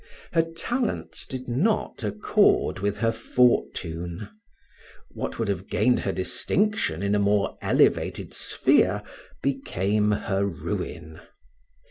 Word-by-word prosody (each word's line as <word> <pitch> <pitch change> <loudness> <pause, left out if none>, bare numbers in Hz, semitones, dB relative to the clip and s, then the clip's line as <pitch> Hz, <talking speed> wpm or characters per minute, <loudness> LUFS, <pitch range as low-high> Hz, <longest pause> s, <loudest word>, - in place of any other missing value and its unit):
Her 165 - +5
talents 220 +10 -3
did 130 -1 -5
not 140 - 0
accord 105 -2 +2
with 100 +1 -1
her 115 -1 +2
fortune; 100 -6 0 0.8
what - - -5
would 115 - -1
have 100 -1 -3
gained 125 0 +3
her 95 - -1
distinction 95 - 0
in 100 0 +1
a 105 - +3
more 100 0 +2
elevated - - +1
sphere, - - +2 0.4
became 105 -6 0
her 100 -1 0
ruin. 80 -3 -4
105 Hz, 110 wpm, -25 LUFS, 95-130 Hz, 0.8 s, Her